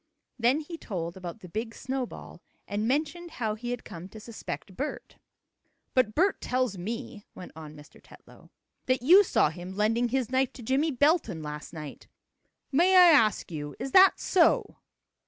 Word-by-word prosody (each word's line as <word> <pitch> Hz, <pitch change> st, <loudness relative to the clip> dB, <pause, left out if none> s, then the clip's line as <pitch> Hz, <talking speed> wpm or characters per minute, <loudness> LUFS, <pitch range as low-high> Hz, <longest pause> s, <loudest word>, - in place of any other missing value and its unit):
Then 250 Hz, +6 st, +3 dB
he 330 Hz, +2 st, -9 dB
told 170 Hz, -5 st, -5 dB
about 185 Hz, +3 st, -8 dB
the 180 Hz, -, -10 dB
big 225 Hz, +5 st, -5 dB
snowball, 260 Hz, -1 st, -6 dB, 0.3 s
and 210 Hz, +2 st, -2 dB
mentioned 310 Hz, +6 st, -1 dB
how 225 Hz, -9 st, -3 dB
he 240 Hz, +3 st, -6 dB
had 245 Hz, -1 st, -4 dB
come 175 Hz, +3 st, -9 dB
to 220 Hz, -, -11 dB
suspect 215 Hz, -3 st, -8 dB
Bert. 285 Hz, +8 st, -6 dB, 0.7 s
"But 235 Hz, -5 st, +2 dB
Bert 380 Hz, +4 st, +2 dB
tells 255 Hz, -4 st, -1 dB
me," 220 Hz, +3 st, -6 dB
went 180 Hz, -, -10 dB
on 155 Hz, -1 st, -10 dB
Mr. 150 Hz, -1 st, -16 dB
Tetlow, -, -, -18 dB, 0.4 s
"that 255 Hz, -1 st, +1 dB
you 365 Hz, +9 st, +8 dB
saw 220 Hz, -, +2 dB
him 175 Hz, +3 st, -8 dB
lending 225 Hz, +3 st, +1 dB
his 255 Hz, -1 st, -1 dB
knife 260 Hz, 0 st, +1 dB
to 245 Hz, -, -11 dB
Jimmie 270 Hz, +7 st, +1 dB
Belton 275 Hz, -, +1 dB
last 150 Hz, -1 st, -7 dB
night. 155 Hz, -4 st, -9 dB, 0.6 s
May 350 Hz, +7 st, +4 dB
I 355 Hz, -2 st, +9 dB
ask 220 Hz, -, +3 dB
you, 145 Hz, -2 st, -6 dB
is 265 Hz, +2 st, -5 dB
that 380 Hz, +4 st, +7 dB
so?" 360 Hz, -3 st, +2 dB
235 Hz, 170 wpm, -28 LUFS, 190-275 Hz, 0.7 s, I